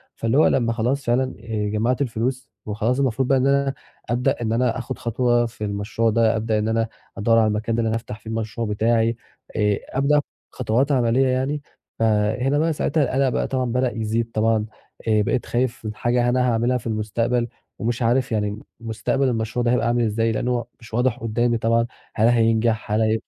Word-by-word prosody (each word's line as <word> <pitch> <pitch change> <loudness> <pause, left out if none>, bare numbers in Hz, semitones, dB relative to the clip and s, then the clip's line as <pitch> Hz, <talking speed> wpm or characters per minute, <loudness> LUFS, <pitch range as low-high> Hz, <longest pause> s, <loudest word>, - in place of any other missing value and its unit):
فاللي 115 +5 0
هو 155 - +6
لما 115 -3 +2
خلاص 125 +4 -1
فعلًا 120 +2 +2 0.2
آآ 105 -2 -3
جمعت 115 +6 0
الفلوس 125 +1 -2 0.2
وخلاص 110 +5 -1
المفروض 130 -1 +1
بقى 135 - +4
إن 130 +1 +2
أنا 140 0 +2 0.4
أبدأ 125 +2 0
إن 110 -1 0
أنا 125 +1 +1
اخد 120 - -5
خطوة 120 0 +1
في 115 -2 -7
المشروع 105 +3 -1
ده، 115 0 +3
أبدأ 110 0 0
إن 105 - -1
أنا 115 0 +1 0.3
أدور 115 +2 +3
على 110 -1 +4
المكان 110 +2 -1
ده 115 - +1
إن 115 - 0
أنا 110 - 0
أفتح 110 -1 -6
فيه 110 - -10
المشروع 115 0 -3
بتاعي، 115 +2 +2 0.4
آآ 105 -2 +2
أبدأ 140 +2 +2
آخد 145 - +2 0.3
خطوات 125 +4 0
عملية 125 0 +3
يعني 135 +3 0 0.4
فهنا 110 +5 +2
بقى 160 0 +2
ساعتها 155 0 +1
القلق 130 +1 +1
بقى - - -1
طبعًا 130 -1 -1
بدأ 125 +1 0
يزيد 115 +1 -1
طبعًا، 110 0 +1 0.4
آآ 110 -1 +4
بقيت 120 - 0
خايف 120 -2 -1
من 105 -1 -4
حاجة 120 +1 +1
أنا 125 0 +2
هاعملها 120 +3 +1
في 115 - -7
المستقبل 115 +3 0 0.3
ومش 120 +2 -2
عارف 120 +1 +2
يعني 105 -1 -1 0.2
مستقبل 115 +4 -1
المشروع 115 +1 -1
ده 120 - +2
هيبقى 125 -1 +2
أعمل 120 0 +2
إزاي 115 +1 +1
لأن 120 - -2
هو 120 -2 0
مش 115 -1 -15
واضح 125 0 +1
قدامي 120 +1 0
طبعًا 115 +1 +2 0.3
هل 110 +1 +4
هينجح 115 -2 +2
هل 110 +1 +2
115 Hz, 195 wpm, -22 LUFS, 110-125 Hz, 0.4 s, هو